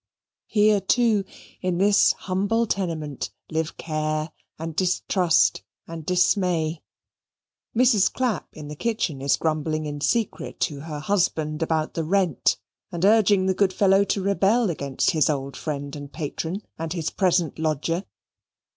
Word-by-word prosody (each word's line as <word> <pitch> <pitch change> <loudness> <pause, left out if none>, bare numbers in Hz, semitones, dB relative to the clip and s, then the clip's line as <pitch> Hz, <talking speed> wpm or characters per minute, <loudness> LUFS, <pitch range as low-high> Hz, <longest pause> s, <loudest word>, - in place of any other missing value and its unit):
Here, 210 -1 +3
too, 220 -1 +2 0.4
in 180 -2 -1
this 200 +2 +4
humble 200 +5 0
tenement, 165 -9 -3 0.2
live 160 0 -2
care, 155 0 -2 0.3
and 160 0 -6
distrust, 180 -1 +2 0.3
and 165 -1 -7
dismay. 175 -2 +1 1.0
Mrs. 235 -6 +4
Clapp 245 -8 -1
in 150 -1 -9
the 150 - -7
kitchen 185 - -2
is 140 0 +2
grumbling 155 -1 -1
in 145 -1 -5
secret 230 +6 -1
to 145 -2 -1
her 150 0 -6
husband 160 -4 0
about 160 -1 0
the 165 - -2
rent, 180 -2 +1 0.3
and 175 +2 -1
urging 205 -2 +4
the 190 - +2
good 190 0 +1
fellow 195 0 +4
to 200 -1 -1
rebel 200 +2 +2
against 140 -4 0
his 155 -2 +2
old 140 -2 -2
friend 145 -2 -5
and 145 -1 -8
patron 165 +5 -4 0.2
and 165 0 -3
his 165 -3 -2
present 175 -5 +1
lodger. 160 +3 -1
170 Hz, 140 wpm, -24 LUFS, 155-195 Hz, 1.0 s, this